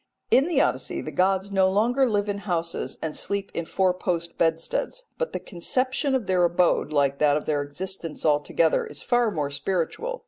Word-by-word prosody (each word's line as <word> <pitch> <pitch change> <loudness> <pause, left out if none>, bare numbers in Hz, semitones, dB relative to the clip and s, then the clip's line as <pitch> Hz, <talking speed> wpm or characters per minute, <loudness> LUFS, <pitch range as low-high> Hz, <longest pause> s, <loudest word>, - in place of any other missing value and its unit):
In 275 +4 +5
the 350 - +1
Odyssey - - -1
the - - -6
gods 190 +1 +1
no 190 -1 +3
longer 240 +7 +2
live 205 -1 0
in 200 0 -2
houses 170 -4 -3
and 160 -1 -3
sleep 200 -1 -2
in 170 - -3
four 185 +2 +1
post 170 -2 -3
bedsteads, 165 - -1
but - - -1
the - - -3
conception 260 - 0
of 250 -5 -1
their 185 -1 +2
abode, 175 -2 +2
like 140 -2 +1
that 150 -1 +4
of 150 - -5
their 145 -2 0
existence 165 +3 -4
altogether, 155 +2 +2
is - - -9
far 240 -2 +2
more 150 -7 -2
spiritual. 190 - -2
185 Hz, 185 wpm, -25 LUFS, 165-210 Hz, -, In